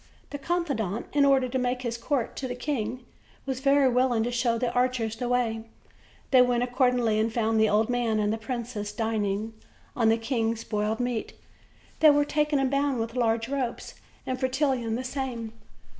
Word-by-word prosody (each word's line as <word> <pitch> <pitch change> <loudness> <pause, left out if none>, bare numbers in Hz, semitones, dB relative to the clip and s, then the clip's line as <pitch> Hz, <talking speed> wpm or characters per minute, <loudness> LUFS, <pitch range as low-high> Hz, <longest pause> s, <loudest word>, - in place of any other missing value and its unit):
The 285 - -5
confidant, 275 - -2
in 285 -1 +4
order 270 -2 +4
to 260 +1 -2
make 250 0 -1
his 235 -1 -2
court 240 +1 -2
to 265 - -3
the 245 - -4
king, 245 -2 -3 0.4
was 265 -2 -3
very 275 0 +4
willing 250 -2 +2
to 240 - -2
show 240 -1 +1
the 235 0 -1
archers 245 -3 0
the 245 +2 -3
way. 230 -3 0 0.7
They 260 -2 +7
went 245 -1 +2
accordingly, 245 -3 +2
and 225 +1 +1
found 225 -1 +1
the 220 -1 +4
old 215 +1 +2
man 240 -3 0
and 210 0 +1
the 225 - -3
princess 225 -3 -4
dining 215 -1 -2 0.4
on 230 -3 +3
the 225 - +3
king's 230 -1 -1
boiled 210 +1 -1
meat. 245 -2 -2 0.7
They 310 - +7
were 290 0 +4
taken 300 0 +1
and 270 -1 +1
bound 280 -2 +1
with 230 +1 -3
large 230 -2 +1
ropes, 260 -3 -3 0.3
and 255 0 -3
Fretillon 260 -3 0
the 250 - -3
same. 250 -4 -4
245 Hz, 185 wpm, -27 LUFS, 225-260 Hz, 0.7 s, They